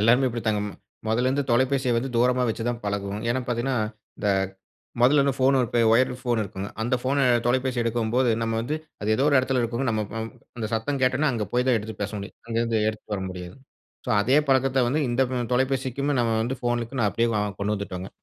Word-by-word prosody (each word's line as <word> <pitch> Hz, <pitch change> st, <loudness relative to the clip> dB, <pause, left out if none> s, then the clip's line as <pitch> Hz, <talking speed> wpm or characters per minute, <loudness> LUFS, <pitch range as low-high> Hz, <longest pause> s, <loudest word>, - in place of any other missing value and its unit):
எல்லாருமே 120 Hz, +5 st, +4 dB
இப்டி 120 Hz, 0 st, -4 dB
தாங்க. 105 Hz, -1 st, +2 dB, 0.5 s
மொதல்லேருந்து 130 Hz, +5 st, +1 dB
தொலைபேசிய 130 Hz, +1 st, +2 dB
வந்து 130 Hz, +3 st, -1 dB
தூரமா 125 Hz, +1 st, +3 dB
வச்சு 115 Hz, +1 st, -2 dB
தான் 120 Hz, -1 st, -2 dB
பழகுவோம். 100 Hz, 0 st, -2 dB
ஏன்னா 130 Hz, +2 st, +1 dB
பார்த்தீங்கன்னா, 120 Hz, +2 st, 0 dB, 0.4 s
இந்த 105 Hz, -, -3 dB, 0.7 s
மொதல்லேருந்து 140 Hz, +1 st, +4 dB
ஃபோன் 135 Hz, +1 st, +4 dB, 0.4 s
ஒயர் 130 Hz, +3 st, +4 dB
ஃபோன் 120 Hz, -3 st, 0 dB
இருக்குங்க, 100 Hz, 0 st, -5 dB
அந்த 120 Hz, +3 st, +1 dB
ஃபோன 135 Hz, +1 st, +2 dB, 0.2 s
தொலைபேசி 130 Hz, 0 st, +1 dB
எடுக்கும்போது 120 Hz, +2 st, +1 dB
நம்ம 115 Hz, 0 st, -1 dB
வந்து 150 Hz, +6 st, -2 dB, 0.2 s
அது 105 Hz, -, -3 dB
ஏதோ 135 Hz, -, +2 dB
ஒரு 140 Hz, -, +4 dB
எடத்துல 130 Hz, -1 st, +1 dB
இருக்கும்ங்க, 120 Hz, +3 st, -1 dB
நம்ம 110 Hz, -1 st, 0 dB
நம் 110 Hz, 0 st, -4 dB, 0.3 s
அந்த 110 Hz, -, -2 dB
சத்தம் 135 Hz, +5 st, -1 dB
கேட்டன்னா 130 Hz, +3 st, +3 dB
அங்கே 110 Hz, -4 st, -2 dB
போய் 125 Hz, +1 st, +1 dB
தான் 120 Hz, -, +4 dB
எடுத்து 110 Hz, +1 st, -6 dB
பேச 100 Hz, -, -3 dB
முடியும். 100 Hz, +2 st, -8 dB
அங்கேருந்து 115 Hz, -1 st, 0 dB
எடுத்துட்டு 110 Hz, -1 st, -5 dB
வர 95 Hz, -, -3 dB
முடியாதுங். 90 Hz, +8 st, -9 dB, 0.4 s
ஸோ -, -, -2 dB
அதே 130 Hz, +6 st, +2 dB
பழக்கத்த 135 Hz, 0 st, +3 dB
வந்து 145 Hz, +5 st, +1 dB
இந்த 120 Hz, +2 st, +2 dB, 0.3 s
தொலைபேசிக்குமே 130 Hz, +2 st, 0 dB
நம்ம 115 Hz, -1 st, +1 dB
வந்து 130 Hz, +3 st, -2 dB
ஃபோனுக்கு 120 Hz, +1 st, -2 dB
நான் 105 Hz, -3 st, +3 dB
அப்டியே 115 Hz, 0 st, +1 dB
வ -, -, +2 dB, 0.2 s
கொண்டு 105 Hz, +1 st, 0 dB
வந்துட்டோங்க. 95 Hz, -2 st, -5 dB
120 Hz, 190 wpm, -25 LUFS, 110-130 Hz, 0.7 s, எல்லாருமே